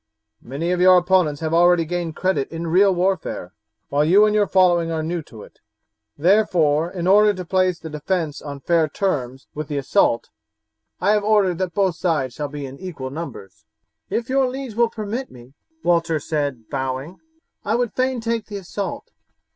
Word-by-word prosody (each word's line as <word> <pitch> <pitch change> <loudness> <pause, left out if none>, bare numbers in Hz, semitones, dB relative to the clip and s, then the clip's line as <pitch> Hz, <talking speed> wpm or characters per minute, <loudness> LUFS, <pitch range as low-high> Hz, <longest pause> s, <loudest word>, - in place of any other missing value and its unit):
Many 145 +8 -3
of 180 0 0
your 185 0 +7
opponents 175 -5 +2
have 160 0 -2
already 175 0 +4
gained 170 -1 -3
credit 185 -7 0
in 165 +1 -5
real 190 +4 +4
warfare, 180 - -2 0.4
while 145 +1 +2
you 190 +7 +5
and 210 - +1
your 210 -1 +3
following 175 -3 +3
are 160 -1 -2
new 170 +1 -2
to 115 -8 -13
it. - - -17 0.6
Therefore, 170 -3 +3
in 175 -2 -5
order 205 +2 +5
to 185 -1 -6
place 185 0 +1
the 165 - -9
defence 155 0 -3
on 140 -2 -8
fair 165 0 +2
terms 135 -8 -2
with 155 0 -5
the 145 -1 -3
assault, 125 -3 +1 0.7
I 200 - +2
have 210 -1 +2
ordered 205 -5 +2
that 185 -3 -3
both 190 -4 +1
sides 150 -8 0
shall 145 +2 -4
be 145 0 -6
equal 135 0 -7
in - - -11
numbers." 150 - -8 0.4
"If 230 +1 -2
your 265 -1 +2
liege 260 -2 -6
will 235 +1 +2
permit 225 +4 -5
me," 125 +1 -15 0.3
Walter 165 -2 +2
said 145 -8 -3
bowing, 135 +5 -4 0.4
"I 215 +2 0
would 240 -1 -1
fain 255 -1 0
take 230 -1 -2
the 205 - -6
assault. 195 +1 -6
175 Hz, 180 wpm, -21 LUFS, 150-195 Hz, 0.7 s, your